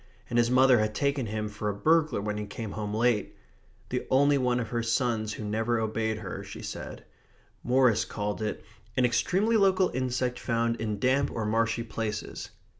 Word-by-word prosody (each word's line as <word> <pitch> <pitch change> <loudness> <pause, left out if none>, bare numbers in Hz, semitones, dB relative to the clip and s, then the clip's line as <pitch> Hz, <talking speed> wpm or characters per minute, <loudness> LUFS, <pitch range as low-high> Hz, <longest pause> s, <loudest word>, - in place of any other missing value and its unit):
And 120 - +3
his 120 0 +3
mother 130 -1 +5
had 110 0 -1
taken 140 -3 0
him 105 0 -3
for 105 0 -4
a 100 - -2
burglar 155 -1 +2
when 105 0 -2
he 105 - -5
came 110 +1 -6
home 105 0 -4
late. 110 -1 +1 0.5
The - - -3
only 140 +2 +4
one 125 -1 +1
of 115 - -3
her 120 -1 -1
sons 115 -2 0
who 110 - -6
never 110 +3 0
obeyed 110 0 -1
her, - - -6
she - - -9
said. - - -7 0.6
Morris 125 -3 +3
called 105 0 -4
it 110 - -3 0.3
"an 130 - +4
extremely 195 - +2
local 190 -2 +4
insect 125 -1 -1
found 115 -1 0
in 110 -2 -2
damp 130 +5 +2
or 115 - -3
marshy 115 +2 +1
places." 110 -1 -4
115 Hz, 185 wpm, -28 LUFS, 110-130 Hz, 0.6 s, mother